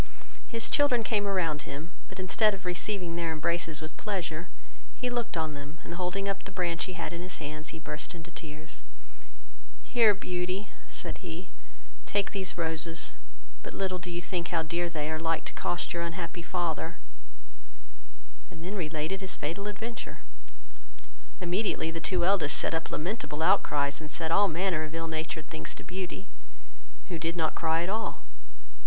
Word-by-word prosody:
His 230 -2 0
children 255 -5 +5
came 205 -2 +2
around 165 -6 +2
him, 150 +5 -5 0.2
but, 190 - -9
instead 205 +3 +5
of 195 -1 -11
receiving 180 -1 0
their 170 -1 +1
embraces 160 0 +1
with 155 0 -6
pleasure, 175 -5 -1 0.5
he 250 -1 -1
looked 240 -7 0
on 160 -1 +1
them, 145 +2 -7
and, - - -5
holding 180 +3 0
up 195 0 0
the 200 - -7
branch 175 -3 +1
he 185 - -4
had 170 -1 -2
in 170 - -3
his 185 +1 -3
hands, 155 +1 -4
he - - -5
burst 155 +2 -4
into 170 +1 -8
tears. 155 -1 -6 1.0
"Here, 230 -4 +6
Beauty, 185 +1 -1 0.2
(said - - -3
he,) 175 +1 -6 0.6
take 205 -1 +2
these 190 -2 -2
roses; 165 0 0 0.5
but - - -6
little 185 -2 +1
do 180 - -5
you 175 0 -1
think 175 -1 -1
how 165 -2 +2
dear 170 +2 +1
they 155 -2 -1
are 155 - 0
like 165 0 +1
to - - -3
cost 175 - 0
your 170 - 0
unhappy 170 +1 -2
father;" 170 -1 0 1.5
and 160 - -9
then 185 +4 -2
related 160 +1 -1
his 190 - -1
fatal 170 +7 -2
adventure: 225 +3 -4 1.2
immediately 180 -2 +2
the 165 - -2
two 175 0 +3
eldest 185 -6 +5
set - - +4
up 165 0 0
lamentable 165 -3 -1
outcries, 145 -2 +4
and 155 - -5
said 160 0 0
all 200 +4 +7
manner 170 -2 +2
of 155 +1 -5
ill 165 0 -1
natured 160 -1 -2
things 160 - -4
to - - -8
Beauty, 190 +2 -4 0.8
who 170 -3 -1
did 165 +1 0
not 160 -2 +2
cry 165 0 +3
at 175 - -1
all. 220 +1 -1
170 Hz, 175 wpm, -31 LUFS, 160-190 Hz, 1.5 s, all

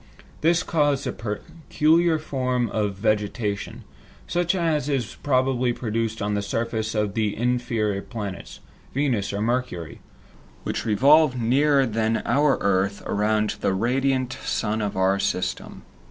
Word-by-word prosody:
This 170 +2 +3
caused 145 -5 +1
a - - -1
peculiar 160 +8 0
form 130 -5 -1
of 105 -2 -1
vegetation, 105 0 -2 0.4
such 175 +1 0
as 160 -5 0
is 135 -6 -2
probably 130 -2 +1
produced 115 -2 -2
on 105 0 -1
the 100 - 0
surface 110 +1 -2
of 105 -2 0
the 105 -2 -1
inferior 115 -4 0
planets, 105 -5 -7 0.3
Venus 130 -8 0
or 100 +1 -3
Mercury, 115 -8 -2 0.6
which - - -3
revolve 135 +5 +4
nearer 135 +4 +3
than 110 -1 0
our 145 0 +3
earth 100 0 +1
around 105 +1 0
the 95 - +1
radiant 130 +3 0
sun 110 0 -1
of 100 -2 -3
our 95 +1 +2
system. 90 - -3
115 Hz, 130 wpm, -24 LUFS, 105-135 Hz, 0.6 s, revolve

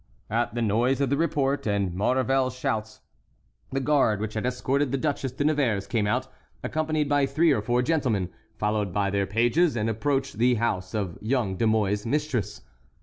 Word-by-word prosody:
At 115 0 0
the 120 - 0
noise 120 +5 +2
of 140 -2 0
the - - +4
report 145 -5 0
and 100 -3 0
Maurevel's 130 +5 +1
shouts, 110 -4 -3 0.7
the 135 - 0
guard 135 -7 +2
which 110 0 -4
had 110 +3 -2
escorted 130 +2 0
the 135 - +1
Duchesse 135 -2 -2
de 140 - -2
Nevers 130 -10 +1
came 105 +1 0
out, 125 +5 0 0.4
accompanied 155 -1 -1
by 145 -1 +2
three 155 +4 +3
or 115 - +2
four 120 +3 +1
gentlemen, 125 - 0 0.3
followed 105 -2 0
by 100 +1 0
their 100 -1 0
pages, 120 - +2
and 115 0 0
approached 135 +1 -1
the 125 +1 +4
house 95 -4 -2
of 95 -5 -3
young 110 -4 0
De 110 +5 +1
Mouy's 105 -2 +1
mistress. 120 -6 -2
120 Hz, 180 wpm, -26 LUFS, 105-140 Hz, 0.7 s, the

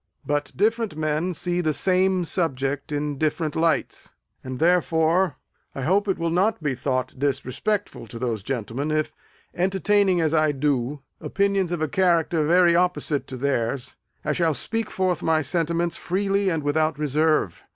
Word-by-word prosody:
But 145 0 -1
different 220 -2 +1
men 155 +1 0
often 185 - -2
see 175 +2 -1
the 155 -3 0
same 185 +2 +2
subject 145 -4 -2
in 145 -1 -2
different 155 0 -1
lights; 165 0 -1 0.3
and, 130 -1 -5
therefore, 165 0 +2 0.4
I 135 - -4
hope 195 +7 +2
it 190 - 0
will 165 0 -1
not 185 +1 +1
be 145 -3 0
thought 130 0 -2
disrespectful 145 - -2
to 115 - -9
those 115 -3 -2
gentlemen, 125 +5 -3
if, 155 0 -1 0.4
entertaining, 190 +1 +2
as 160 -1 +1
I 155 -2 +3
do, 140 -1 -1 0.2
opinions 200 -3 0
of 170 -3 -1
a - - +1
character 170 -1 +2
very 175 0 +5
opposite 175 -4 0
to 130 - -7
theirs, 130 -1 -2 0.3
I 150 - +1
shall 160 -1 +1
speak 225 +8 -2
forth 185 -3 -1
my 160 -1 +2
sentiments 170 +1 -1
freely 195 +1 0
and 160 -4 -1
without 155 +1 +1
reserve. 150 - +1
160 Hz, 160 wpm, -24 LUFS, 145-180 Hz, 0.4 s, very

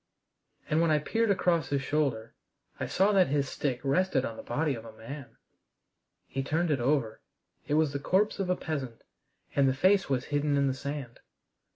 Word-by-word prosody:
And 155 +2 +2
when 170 - +3
I 155 - +4
peered 225 +9 0
across 175 -6 +2
his 140 -1 0
shoulder 130 -6 -1 0.5
I - - -2
saw 195 +3 +3
that 195 -3 +4
his 140 0 0
stick 130 -2 -2
rested 140 -1 +2
on 115 - -5
the - - -8
body 155 -1 -1
of 115 -3 -7
a 115 - -10
man. 135 +4 -9 0.9
He 135 - -3
turned 160 +4 0
it 140 - +1
over. 120 -3 0 0.5
It 145 - +1
was 155 -3 +2
the 140 - -2
corpse 195 +8 +1
of 190 -2 -1
a 180 - +3
peasant, 140 -9 -5 0.5
and 140 -1 +4
the 130 - 0
face 190 +5 +3
was 130 -2 0
hidden 145 0 0
in 140 - +3
the 135 - +1
sand. 140 -2 -6
145 Hz, 195 wpm, -29 LUFS, 135-165 Hz, 0.9 s, I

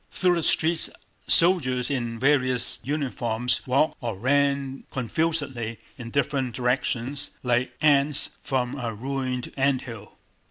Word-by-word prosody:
Through 180 -1 +2
the 170 - 0
streets 160 +1 +4 0.4
soldiers 135 -8 +3
in 120 -4 -2
various 130 -1 +1
uniforms 125 -4 -1
walked 140 +4 +2
or 115 -6 -3
ran 140 +2 0
confusedly 130 -3 -2 0.2
in 120 -3 -8
different 135 -2 -1
directions 125 +2 -1
like 125 0 0
ants 145 -1 +3
from 130 0 -2
a 115 -4 -4
ruined 130 +1 -3
ant 135 -1 +1
hill. 115 -5 -10
130 Hz, 120 wpm, -25 LUFS, 120-140 Hz, 0.4 s, streets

